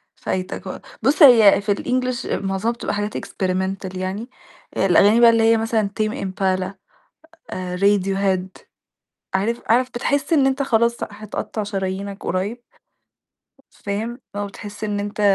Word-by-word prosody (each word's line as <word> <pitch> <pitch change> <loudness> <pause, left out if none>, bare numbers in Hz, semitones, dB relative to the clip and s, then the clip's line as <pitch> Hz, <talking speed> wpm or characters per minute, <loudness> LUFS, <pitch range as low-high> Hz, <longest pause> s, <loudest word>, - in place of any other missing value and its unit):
فايتك 185 0 -4
و - - -6 0.2
بُصّ 300 +4 +4
هي 225 -8 +8
في 205 0 0
الEnglish 255 +2 -2 0.2
معظمها 195 +4 -1
بتبقى 235 - -4
حاجات 205 +1 -3
Experimental 190 0 -3
يعني، 190 +6 -4 0.5
الأغاني 200 +4 +5
بقي 235 -1 +8
اللي 230 -1 +3
هي 225 0 +5
مثلًا 225 -2 0
Tame 215 0 0
Impala، 190 0 -1 0.8
آآ 180 -1 -4
Radiohead، 195 -1 +1 0.9
عارف 215 +5 0
عارف 245 +3 +3
بتحس 280 +6 -1
إن 285 -4 +4
أنت 270 +1 +1
خلاص 235 -2 +2
هتقطع 215 +1 -5
شرايينك 195 0 -4
قريب. 200 +7 -2 1.1
فاهم؟ 220 +4 -4 0.2
آه 205 0 -2
بتحس 205 +1 -8
إن 205 -1 -2
أنت 205 +1 -5
205 Hz, 135 wpm, -21 LUFS, 195-235 Hz, 1.1 s, هي